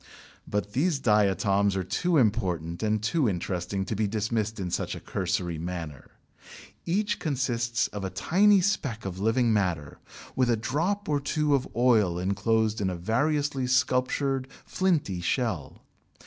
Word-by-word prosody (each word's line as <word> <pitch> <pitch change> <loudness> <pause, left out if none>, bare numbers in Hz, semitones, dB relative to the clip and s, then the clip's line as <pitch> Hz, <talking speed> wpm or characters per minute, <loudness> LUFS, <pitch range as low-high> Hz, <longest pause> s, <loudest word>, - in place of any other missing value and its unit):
But 105 0 -2
these 155 +4 +1
diatoms 100 -3 +2
are 95 - -1
too 170 - 0
important 90 - 0
and 110 -1 0
too 130 +2 +2
interesting 90 +1 -3
to 110 - -3
be 105 +1 0
dismissed 110 +1 -2
in 90 -2 -3
such - - -2
a - - -7
cursory 90 -3 -2
manner. 85 -5 -6 0.8
Each 205 +4 0
consists 120 -5 0
of 105 -1 -6
a 95 - -2
tiny 200 - +4
speck 140 - -1
of 95 -1 -5
living 115 +3 +2
matter 90 -8 -1 0.4
with 130 -2 +2
a 115 - +3
drop 165 - -1
or 145 -1 +1
two 150 +1 0
of 135 -2 +1
oil 110 -8 +3
enclosed 105 +4 0
in 95 - +1
a 90 - -3
variously 135 - 0
sculptured 130 +1 +1 0.2
flinty 155 - 0
shell. 95 - -2
110 Hz, 150 wpm, -27 LUFS, 95-135 Hz, 0.8 s, tiny